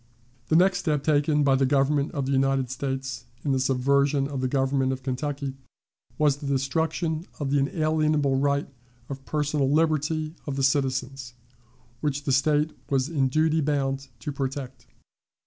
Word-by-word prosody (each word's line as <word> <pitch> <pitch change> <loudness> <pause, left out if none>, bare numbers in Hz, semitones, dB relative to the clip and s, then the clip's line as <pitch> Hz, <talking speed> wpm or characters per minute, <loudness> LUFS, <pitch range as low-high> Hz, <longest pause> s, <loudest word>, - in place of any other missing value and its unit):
The 155 - +2
next 180 +2 +4
step 150 -6 0
taken 150 0 +2
by 140 -1 +4
the 135 0 +3
Government 140 +1 +2
of 140 -4 -2
the 135 - -2
United 135 -1 +1
States 135 -1 -4 0.2
in 140 - +1
the 135 - +2
subversion 140 +2 +2
of 140 -2 -4
the 130 - +1
government 135 0 +1
of 130 0 -5
Kentucky 140 +1 -3 0.6
was 145 -2 +3
the 145 -1 -7
destruction 160 +4 -1
of 140 -2 -2
the 145 - +3
unalienable 155 -1 +1
right 140 +1 +1 0.4
of 135 -1 -6
personal 150 -2 0
liberty 155 0 +1
of 140 - -2
the 135 - -1
citizens, 130 -2 -1 0.6
which 145 -1 -2
the 140 - -1
State 150 +3 +2 0.2
was 135 +1 +1
in 140 -5 +1
duty 155 +3 +2
bound 135 -2 -1
to 145 - -3
protect. 135 -1 -5
140 Hz, 160 wpm, -26 LUFS, 135-150 Hz, 0.6 s, next